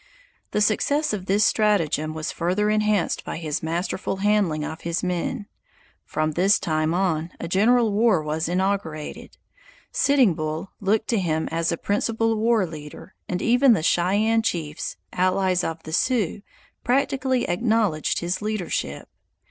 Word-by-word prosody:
The 210 - -1
success 285 +8 +1
of 190 -2 -4
this 205 +2 +3
stratagem 165 -8 +1
was 160 0 -3
further 185 +5 0
enhanced 215 -3 +1
by - - -5
his 160 -1 -3
masterful 170 +4 -2
handling 195 -6 +1
of 160 - -7
his 170 +2 -2
men. 180 +2 -2 0.6
From 155 0 -1
this 190 +6 +3
time 155 -1 0
on 170 -3 0
a 170 - -4
general 220 +5 +3
war 205 -6 +3
was 155 +2 -2
inaugurated; 180 -4 -3 0.5
Sitting 280 - +3
Bull 155 +4 -4
looked 215 +2 +1
to 230 - +2
him 160 -3 -1
as 165 +1 0
a 170 - -1
principal 225 +4 0
war 220 -2 +2
leader, 150 -3 -10 0.2
and 180 - -2
even 245 +2 +5
the 160 - 0
Cheyenne 205 +7 +2
chiefs, 160 -8 -3 0.2
allies 185 0 +1
of 165 0 -4
the 155 - -8
Sioux, 210 -2 0 0.4
practically 260 0 +1
acknowledged 205 -4 +1
his 175 +3 -2
leadership. 210 -4 -3
190 Hz, 145 wpm, -24 LUFS, 165-215 Hz, 0.6 s, even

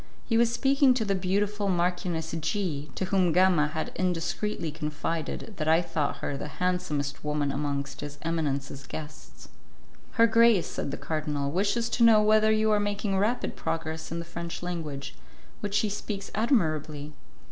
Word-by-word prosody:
He 225 - 0
was 230 0 +4
speaking 270 +1 +4
to 225 -3 0
the 200 - +1
beautiful 200 +2 0
Marchioness 175 -2 0
G, 160 -4 -2
to 190 - -1
whom 185 -2 +2
Gama 180 -3 +4
had 155 +1 -4
indiscreetly 175 0 -1
confided 155 +6 -3
that 155 - -2
I 165 +2 +4
thought 160 -4 -1
her 145 - -2
the 140 - -5
handsomest 180 -6 -1
woman 150 -1 0
amongst 140 0 -3
his 145 0 -7
eminence's 140 -4 -2
guests. 155 -1 -9 0.6
"Her 230 - +6
grace," 230 -4 +5
said - - -4
the 145 - -4
Cardinal, 150 -3 -2
"wishes 205 +7 +1
to 240 - +1
know 225 -2 +8
whether 215 +1 +4
you 215 0 +3
are 210 - +4
making 205 -1 -1
rapid 225 +5 0
progress 160 -1 -3
in 165 - -2
the 170 - -4
French 170 +1 -6
language, 155 -6 -4 0.5
which 205 -1 -3
she 215 - +3
speaks 200 -1 -5
admirably." 155 - 0
175 Hz, 160 wpm, -28 LUFS, 150-205 Hz, 0.6 s, know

